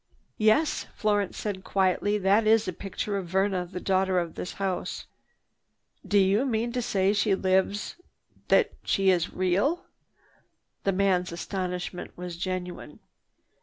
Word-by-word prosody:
"Yes," 220 +9 +2
Florence 205 -2 0
said 200 -3 -4
quietly, 195 +2 +1
"that 205 +2 +3
is 220 -1 +4
a 185 - -2
picture 200 +3 -4
of 190 -3 -4
Verna, 190 0 0
the 180 +1 -6
daughter 190 0 +1
of 170 -2 -1
this 180 - -6
house." 190 -2 -3 1.0
"Do 205 - +1
you 200 +4 +4
mean 235 -2 -1
to 250 +1 -1
say 195 -4 +1
she 205 -1 +2
lives—that 190 - 0
she 195 -1 +3
is 175 -2 0
real!" 200 - +1 1.0
The 195 - +3
man's 185 -2 +1
astonishment 180 0 -4
was 180 -1 -6
genuine. 180 0 -5
195 Hz, 130 wpm, -27 LUFS, 185-205 Hz, 1.0 s, is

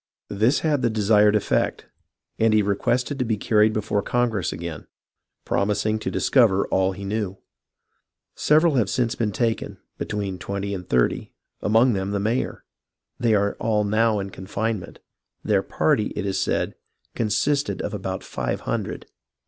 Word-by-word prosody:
This 110 +7 +2
had 150 -4 +1
the 120 - +2
desired 105 -1 +4
effect; 105 - 0 0.5
and 110 -1 +4
he 105 - +4
requested 125 +7 0
to - - +2
be 110 -3 -1
carried 105 +1 +3
before 105 -1 -1
Congress 115 -7 0
again, 85 -2 -6 0.6
promising 105 +2 0
to - - -3
dis - - -1
cover 110 -7 +4
all 95 0 +2
he 100 +1 -8
knew. 100 -2 -2 1.0
Several 155 +2 +3
have 115 - +2
since 120 -2 0
been 110 -3 -1
taken, 115 +1 -1 0.2
be - - -2
tween 100 -3 -3
twenty 100 0 -3
and 90 -2 -6
thirty, 60 -1 +1 0.3
among 115 +4 +4
them 95 -1 -2
the 100 0 -1
mayor. 110 +5 -1 0.6
They 115 -2 +3
are 100 0 +1
all 110 -2 +1
now 110 +1 +2
in 100 -1 -4
confinement. 105 +2 -4 0.5
Their - - +2
party, - - +1
it - - -3
is 95 -1 -1
said, - - 0 0.4
con 115 - -1
sisted 140 +7 0
of - - -4
about 95 -2 -4
iive 60 -1 -3
hundred." - - -3
105 Hz, 160 wpm, -23 LUFS, 100-115 Hz, 1.0 s, desired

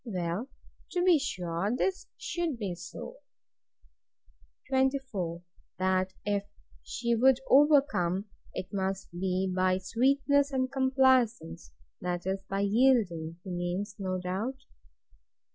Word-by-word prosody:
Well, 185 +1 -3 0.4
to 355 -1 +1
be 355 -4 +5
sure 180 -6 -2
this 380 +6 -1
should 340 -6 -2
be 200 -5 -3
so. 180 - -9 1.5
24. 260 -11 0 0.3
That 185 0 +1
if 205 -1 0 0.4
she 235 0 -2
would 255 +2 +5
overcome, 270 - +4 0.3
it 185 - -6
must 195 0 -2
be 185 +2 -1
by 185 0 +2
sweetness 275 +8 +2
and 260 -1 0
complaisance; 260 - +2 0.3
that 175 -1 -3
is, 190 +1 -1
by 195 0 -1
yielding, 200 -7 +2
he 190 - -7
means, 180 +4 -3
no 185 -1 -2
doubt. 195 +9 -3
200 Hz, 110 wpm, -29 LUFS, 185-265 Hz, 1.5 s, be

